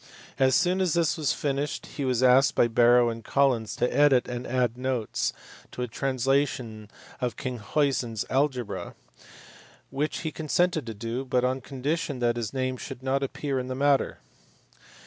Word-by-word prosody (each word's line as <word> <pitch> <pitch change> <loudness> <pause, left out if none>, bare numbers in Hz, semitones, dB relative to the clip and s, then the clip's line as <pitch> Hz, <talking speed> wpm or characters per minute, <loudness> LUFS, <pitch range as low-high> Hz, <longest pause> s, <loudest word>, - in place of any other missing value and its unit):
As 130 -1 +4
soon 185 +1 +2
as 180 -4 +1
this 170 -2 +2
was 155 -4 0
finished 145 0 -2
he 140 - -5
was 130 -1 +1
asked 130 +2 +5
by 120 - +4
Barrow 120 +1 +5
and 115 0 -6
Collins 125 -4 +1
to 125 - 0
edit 145 -4 +4
and 120 0 -5
add 125 -2 0
notes 125 -3 -1 0.4
to 125 - -4
a - - -2
translation 130 -3 -1 0.3
of 125 -4 -2
Kinckhuysen 125 +1 -1
s 110 - -3
Algebra; 130 -6 -1 1.0
which 145 +3 -2
he 160 - -3
consented 160 -1 0
to 115 - -5
do, 115 +4 -4
but 125 -1 0
on 130 +1 -1
condition 140 +3 -3
that 120 -1 +1
his 115 -3 -3
name 130 -1 -2
should 125 - -8
not 135 +1 0
appear 135 0 -2
iu 125 - -4
the 130 - -4
matter. 140 0 +2
130 Hz, 165 wpm, -27 LUFS, 120-140 Hz, 1.0 s, asked